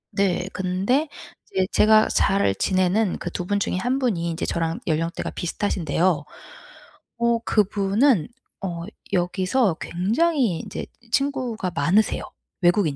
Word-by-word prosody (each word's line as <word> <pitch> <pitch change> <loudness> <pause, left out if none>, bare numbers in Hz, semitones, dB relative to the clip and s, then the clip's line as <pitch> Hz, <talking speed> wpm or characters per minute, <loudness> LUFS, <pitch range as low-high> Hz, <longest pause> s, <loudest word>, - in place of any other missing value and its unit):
네. 190 -2 +1
근데 195 +11 0 0.4
이제 190 -1 +1
제가 215 0 +5
잘 195 - +2
지내는 185 - +1
그 175 - -5
2 180 - -4
분 205 +1 +1
중에 185 - -1
1 245 +8 0
분이 200 -11 0
인제 165 +1 -3
저랑 165 -1 -1
연령대가 165 +1 -1
비슷하신데요. 175 -3 0 0.9
어 235 0 +2
그분은 205 - +2 0.4
어 170 -3 -3 0.3
여기서 185 +3 +1
굉장히 230 - +1
인제 - - -6 0.3
친구가 255 -9 -1
많으세요. 205 +5 +2 0.4
외국인 175 -4 +3
190 Hz, 250 characters per minute, -23 LUFS, 175-225 Hz, 0.9 s, 제가